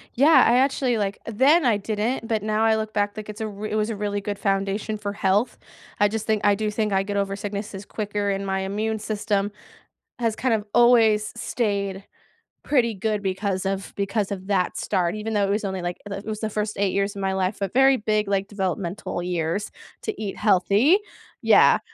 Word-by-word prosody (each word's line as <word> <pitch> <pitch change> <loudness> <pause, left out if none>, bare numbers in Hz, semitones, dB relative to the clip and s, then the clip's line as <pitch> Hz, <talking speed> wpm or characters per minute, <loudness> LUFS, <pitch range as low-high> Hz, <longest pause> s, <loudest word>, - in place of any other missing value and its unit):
Yeah. 290 +6 +6
I 245 - +5
actually, 260 -3 +1
like 200 -1 -2
then 275 +9 +4
I 235 -4 +4
didn't, 220 +4 -2
but 220 -2 -1
now 215 +1 +1
I 225 0 +4
look 220 0 -3
back, 205 0 -1
like, 215 -1 -7
it's 210 0 -8
a 220 - -1
r 210 0 -6
it 215 - -2
was 215 +1 0
a 220 - -3
really 205 0 -2
good 200 0 -4
foundation 200 +2 -1
for 205 -1 -4
health. 205 +3 +1 0.4
I 205 - +5
just 220 +1 -4
think 215 -2 0
I 205 0 +5
do 215 +1 -1
think 210 0 -1
I 195 0 +3
get 200 +1 -4
over 200 0 -1
sicknesses 200 -1 -5
quicker 205 0 -2
and 195 0 -2
my 190 0 -1
immune 215 +3 -2
system 210 -1 -1 0.7
has 225 -2 0
kind 250 -3 0
of 210 -2 -1
always 225 -3 +5
stayed 200 -5 -2 0.6
pretty 240 -6 +2
good 210 +1 -2
because 190 0 -2
of 195 0 -3
because 200 +1 -1
of 190 -1 -5
that 190 -3 0
start. 180 -2 0
Even 215 +1 -4
though 205 -1 +2
it - - -3
was 210 +2 0
only, 190 -1 -3
like, 175 0 -3
the 200 - -4
it 200 - -9
was 215 -1 -4
the 220 - -1
first 210 0 -3
8 200 -1 +1
years 200 +1 0
of 200 - -5
my 190 0 0
life. 190 +1 -1
A 195 - 0
very 270 +4 +4
big, 215 -1 0
like, 195 -1 0
developmental 190 -2 -3
years 175 +2 -2 0.3
to 435 - -4
eat 200 -2 -4
healthy. 210 - +4 0.4
Yeah. - - +6
205 Hz, 215 wpm, -24 LUFS, 195-220 Hz, 0.7 s, Yeah